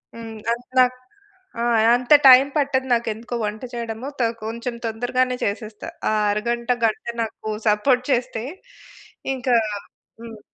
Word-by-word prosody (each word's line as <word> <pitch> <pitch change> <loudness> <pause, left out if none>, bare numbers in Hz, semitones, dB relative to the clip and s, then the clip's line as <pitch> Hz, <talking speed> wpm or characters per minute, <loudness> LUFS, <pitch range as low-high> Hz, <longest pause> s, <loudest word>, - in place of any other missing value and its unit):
హ్మ్. 225 -1 -8
అంత్ 240 +1 -4
నాక్ 255 0 +4 0.6
ఆ! - - 0 0.3
అంత 250 +3 +2
టైమ్ 265 +2 +8
పట్టదు 270 -2 0
నాకు. 235 0 0
ఎందుకో 235 +3 -7
వంట 210 +2 -5
చేయడము. 235 +1 -5
త - - +1 0.2
కొంచెం 235 +2 -4
తొందరగానే 250 +3 0
చేసేస్తా. 215 +1 -5 0.2
ఆ - - +1 0.2
అరగంట, 235 +3 -2 0.2
గంట 215 - -1 0.2
నాకు 220 0 -7 0.2
సపోర్ట్ 245 +5 +3
చేస్తే 240 -2 -1 0.9
ఇంకా 255 -1 +1 0.7
హ్మ్. 225 -2 -10
235 Hz, 130 wpm, -22 LUFS, 220-255 Hz, 0.9 s, టైమ్